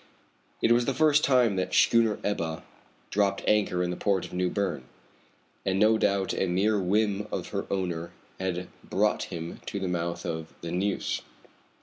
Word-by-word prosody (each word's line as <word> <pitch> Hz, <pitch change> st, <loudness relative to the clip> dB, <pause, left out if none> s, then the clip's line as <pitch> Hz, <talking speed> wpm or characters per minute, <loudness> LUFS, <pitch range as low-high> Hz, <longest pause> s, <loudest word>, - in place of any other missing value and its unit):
It 115 Hz, -, +4 dB
was 120 Hz, 0 st, +4 dB
the 135 Hz, -, -1 dB
first 150 Hz, -1 st, +4 dB
time 125 Hz, -7 st, +4 dB
that 95 Hz, -, 0 dB
the -, -, -2 dB
schooner 115 Hz, -2 st, +4 dB
Ebba 85 Hz, -6 st, -1 dB
had -, -, -14 dB, 0.5 s
dropped 100 Hz, -1 st, +1 dB
anchor 100 Hz, -4 st, +2 dB
in 90 Hz, -, -1 dB
the -, -, -3 dB
port 100 Hz, -2 st, 0 dB
of -, -, -11 dB
New 90 Hz, 0 st, +1 dB
Berne, 90 Hz, -11 st, -2 dB, 0.8 s
and 95 Hz, 0 st, 0 dB
no 110 Hz, +2 st, +4 dB
doubt 100 Hz, -1 st, +1 dB
a 95 Hz, -, 0 dB
mere 100 Hz, +4 st, +2 dB
whim 100 Hz, +2 st, +1 dB
of -, -, -3 dB
her 100 Hz, -1 st, -3 dB
owner 85 Hz, -3 st, -2 dB, 0.3 s
had 90 Hz, -1 st, -2 dB, 0.2 s
brought -, -, +1 dB
him 85 Hz, 0 st, -7 dB
to 100 Hz, -, -3 dB
the 95 Hz, -, -2 dB
mouth 85 Hz, -1 st, -2 dB
of 80 Hz, -1 st, -5 dB
the 85 Hz, -, -5 dB
Neuse. 95 Hz, +3 st, -1 dB
95 Hz, 185 wpm, -28 LUFS, 90-105 Hz, 0.8 s, It